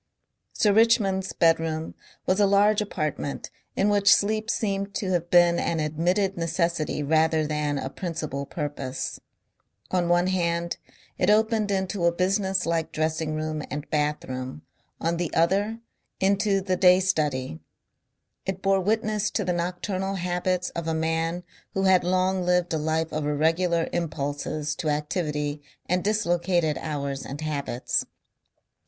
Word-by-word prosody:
Sir 205 -2 +2
Richmond's 200 -4 +3
bedroom 160 -1 +1 0.3
was 185 +2 +2
a 205 - +5
large 205 +2 +4
apartment 155 -8 -3 0.2
in 200 - +2
which 205 -1 +4
sleep 215 +2 +3
seemed 200 -3 -1
to 190 -2 -1
have 175 -1 0
been 175 -1 +5
an 165 - -1
admitted 175 +6 0
necessity 165 -2 -1
rather 160 +1 +2
than 150 -1 -1
a 135 - -3
principal 155 -3 -4
purpose. 145 -4 -4 0.7
On 175 -2 +1
one 175 +1 +4
hand 170 -2 0 0.4
it 180 - +2
opened 220 0 +3
into 190 -2 -1
a 170 - +5
business 190 +1 0
like 165 -1 -1
dressing 155 0 -1 0.3
and 150 +2 -5
bath 150 0 0
room, 130 +2 -6 0.4
on 165 +1 0
the 170 -2 -2
other 200 +7 +2 0.4
into 200 +1 +2
the 185 -1 0
day 180 0 +6
study. 145 - -1 0.9
It 190 0 -3
bore 195 0 +3
witness 215 +1 0
to 210 - -1
the 180 - +1
nocturnal 185 +3 -2
habits 180 0 -1
of 170 -1 -5
a 160 - 0
man 165 +2 -1 0.3
who 195 - +1
had 190 -2 +5
long 185 +1 +1
lived 180 -1 +1
a 160 - 0
life 160 +1 -1
of 150 -1 -1
irregular 165 +3 +1
impulses 150 -2 -2
to 155 - -1
activity 150 -1 -2 0.3
and 180 0 +1
dislocated 175 -6 +1
hours 140 -3 -3
and 140 +2 -7
habits. 140 -5 -1
175 Hz, 140 wpm, -26 LUFS, 155-190 Hz, 0.9 s, day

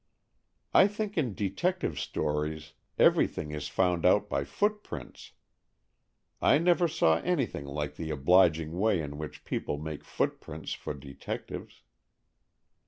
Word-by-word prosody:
"I 195 - +7
think 210 0 -4
in 125 - 0
detective 105 - -1
stories 75 +1 -2 0.2
everything 75 - +3
is 75 -1 -4
found 90 0 +1
out - - +4
by 70 - 0
footprints. 210 - -3 1.1
I - - +5
never 175 +2 +3
saw 80 - +3
anything 140 - -1
like 75 +1 -4
the 80 - -4
obliging 80 +1 +4
way 105 -3 +3
in 75 -1 -5
which 75 -1 -7
people 75 - -2
make 75 0 -6
footprints 75 +1 -3
for - - -5
detectives." 70 -1 -7
80 Hz, 120 wpm, -29 LUFS, -, 1.1 s, I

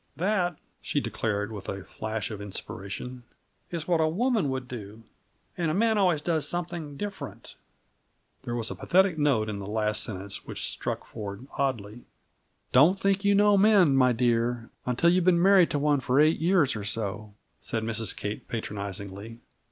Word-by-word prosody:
That," 180 -3 0 0.2
she - - -1
declared 105 0 -2
with 105 -3 -7
a 100 -1 -5
flash 110 0 -4
of 105 -2 -6
inspiration, 100 +4 -6 0.5
"is 165 -3 -4
what 170 -2 +2
a 160 - +3
woman 210 - +1
would 130 -1 -3
do. 110 -2 -8 0.5
And 170 -2 -1
a 155 - 0
man 220 +2 +3
always 180 -7 +2
does 160 -3 0
something 170 -4 -4
different!" 205 +2 -7 0.9
There 120 -3 -4
was 115 -2 -1
a - - -4
pathetic 185 -3 +2
note 135 -7 +2
in 105 -2 -4
the 100 - -6
last 105 0 0
sentence, 100 -1 -5
which - - -4
struck - - -3
Ford 105 +3 -7
oddly. 120 -4 -2 0.7
"Don't 160 +10 +5
think 195 0 +1
you 200 0 +4
know 205 0 +5
men, 195 -8 +5
my 130 -1 +5
dear, 120 0 0 0.2
until 125 +8 +3
you've 180 0 +3
been 180 -2 +5
married 190 -1 +6
to - - -1
one 145 0 +2
for 130 +1 +1
eight 155 +2 +4
years 165 -5 +3
or 105 - -4
so," 105 0 -4 0.2
said 110 -1 -3
Mrs. 110 0 0
Kate 105 +1 -5
patronizingly. 100 0 -5
130 Hz, 170 wpm, -27 LUFS, 110-175 Hz, 0.9 s, married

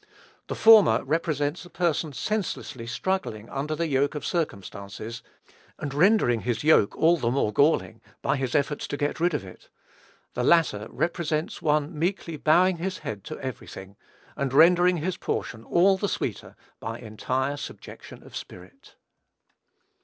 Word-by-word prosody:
The - - -4
former 220 -2 +6
represents 155 -1 -1
a 175 - -13
person 170 -4 -1
senselessly 145 - -3
struggling 120 - -2
under 150 +3 -2
the 170 - -1
yoke 140 -1 +1
of 150 - -5
circumstances, 110 - -4 0.6
and 140 - -5
rendering 155 - +4
his 120 +2 -2
yoke 150 -9 +4
all 170 +2 +4
the 115 -7 0
more 120 -4 0
galling 140 - +2 0.2
by 135 +1 +1
his 130 -2 -2
efforts 145 +1 0
to 145 - -4
get 145 +2 -2
rid 170 -1 +2
of 140 - -3
it; 90 - -14 0.6
the 125 - -2
latter 140 -9 +3
represents 165 -2 -2
one 150 +1 +1
meekly 170 -1 -1
bowing 175 +5 +3
his 185 +2 -3
head 100 -3 -5
to - - -6
every 130 -3 -6
thing, 95 +1 -10 0.4
and 135 -2 -2
rendering 175 +4 +5
his 170 +3 -2
portion 115 -2 -4
all 190 +7 +3
the 205 +1 -1
sweeter - - -4 0.2
by 115 +1 -5
entire 130 +5 -2
subjection 145 - -10
of - - -13
spirit. - - -11
150 Hz, 155 wpm, -26 LUFS, 120-170 Hz, 0.6 s, former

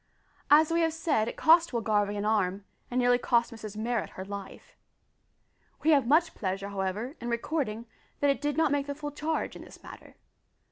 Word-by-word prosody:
As 305 +2 +6
we 335 0 +2
have 325 -1 +1
said, 310 -9 0
it - - -5
cost 330 -1 +5
Will 235 - 0
Garvie 205 -2 +1
an 205 - -2
arm, 200 -2 0 0.2
and 250 - -1
nearly 245 0 +3
cost 235 -1 +1
Mrs 215 -2 -8
Marrot 230 +1 -2
her 190 - -5
life. 200 -1 -9 1.1
We 320 - +4
have 280 -6 +4
much 320 +5 +3
pleasure, 195 0 -3
however, 200 - -3
in 240 - -4
recording, 235 -2 -2 0.3
that 285 -1 +3
it 275 - -3
did 295 -1 -1
not 320 -3 +3
make 285 -1 0
the 285 - -4
full 295 0 -6
charge 310 +2 -3
in - - -9
this - - -14
matter. - - -12
245 Hz, 195 wpm, -28 LUFS, 210-295 Hz, 1.1 s, As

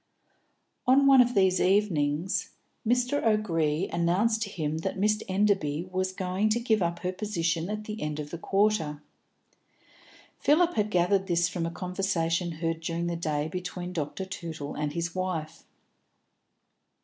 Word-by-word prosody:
On 270 +2 +6
one 270 -2 +8
of 245 0 +1
these 190 -2 +3
evenings, 180 -4 +1 0.3
Mr. 250 +4 +1
O'Gree 180 -6 +1
announced 190 +7 +2
to 215 - -2
him 155 -4 -2
that 165 - -3
Miss 210 +2 +2
Enderby 185 -5 +1
was 185 0 -1
going 185 +2 -1
to 225 +2 +2
give 225 -3 +1
up 170 0 -1
her 180 - -1
position 175 -4 -1
at 210 0 -3
the 215 0 -6
end 150 0 -3
of 150 0 -6
the 170 - -5
quarter. 195 -7 +1 1.4
Philip 335 +4 +3
had 210 -1 0
gathered 190 +1 +2
this 170 -1 +2
from 165 -1 -2
a - - -2
conversation 175 -1 -1
heard 165 0 -2
during 165 +1 -3
the 170 0 -1
day 155 -3 -1
between 180 +1 -5
Dr. 165 +3 -3
Tootle 165 -6 -6
and 150 -1 -3
his 170 +1 -2
wife. 165 -4 -4
180 Hz, 150 wpm, -28 LUFS, 165-210 Hz, 1.4 s, one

